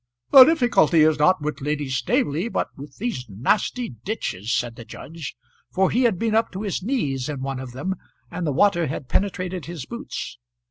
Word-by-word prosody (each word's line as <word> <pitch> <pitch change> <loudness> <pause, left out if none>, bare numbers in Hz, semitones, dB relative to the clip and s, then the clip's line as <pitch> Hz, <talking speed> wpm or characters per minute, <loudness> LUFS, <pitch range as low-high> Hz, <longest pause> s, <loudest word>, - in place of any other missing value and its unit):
"The 265 -2 +11
difficulty 240 - +4
is 155 -1 +4
not 170 +2 +3
with 150 -1 -3
Lady 145 0 -2
Staveley 170 - 0
but - - -1
with 140 0 -11
these 200 - -4
nasty 205 - 0
ditches," 115 - -3
said 120 -1 -1
the 115 - -9
judge, 150 +6 -8 0.3
for 190 0 +1
he 250 +3 +2
had 220 -6 +2
been 225 +3 0
up 225 +1 +2
to 190 +3 -4
his 200 -4 -2
knees 150 - -1
in 140 -3 -4
one 135 -1 -3
of 130 -2 -8
them, 165 +10 -2 0.4
and 175 -2 -3
the - - +1
water 170 +2 +3
had 130 -1 -5
penetrated 185 0 -1
his 165 -6 -6
boots. 235 - -6
165 Hz, 190 wpm, -23 LUFS, 135-215 Hz, 0.4 s, The